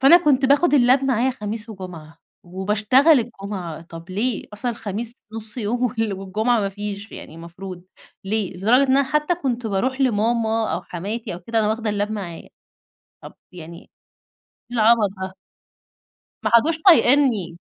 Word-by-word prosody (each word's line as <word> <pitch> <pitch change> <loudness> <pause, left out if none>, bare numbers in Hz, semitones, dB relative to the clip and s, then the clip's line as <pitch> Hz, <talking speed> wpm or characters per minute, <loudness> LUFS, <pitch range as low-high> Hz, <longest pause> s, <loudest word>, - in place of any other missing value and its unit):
فأنا 280 +6 +8
كنت 275 -2 +3
باخد 290 +3 +4
اللاب 255 +1 +4
معايا 260 -1 +2
خميس 220 -2 -6
وجمعة 180 -6 -10 0.3
وباشتغل 210 - +3
الجمعة، 195 -8 -6
طب 170 +1 -11
ليه؟ 220 +4 -2
أصلًا 225 +4 -2
الخميس 225 +1 -5 0.2
نص 220 +1 -7
يوم 240 +2 -1
وال 225 -3 -1
والجمعة 210 +5 0
ما 200 - 0
فيش 205 +1 -7
يعني - - -10
المفروض، 175 +2 -9 0.4
ليه؟ 200 -2 -2
لدرجة 225 +8 +4
إن 265 -1 +3
أنا 280 - +4
حتى 300 +5 0
كنت 250 -8 -3
باروح 255 +7 -1
لماما 225 -3 +1
أو 175 - -3
حماتي 195 +6 -5
أو 175 - -9
كده 225 +5 -2
وأنا 210 - +1
واخدة 220 0 -1
اللاب 205 +1 -1
معايا. 185 -6 -6 0.7
طب - - -11 0.2
يعني 170 -2 -10 0.7
إيه 240 0 -10
العبط 220 -1 +4
ده؟ 190 0 -4 1.1
ما 215 - 0
عادوش 310 +8 +4
طايقينني. 245 - +4
220 Hz, 150 wpm, -22 LUFS, 195-245 Hz, 1.1 s, فأنا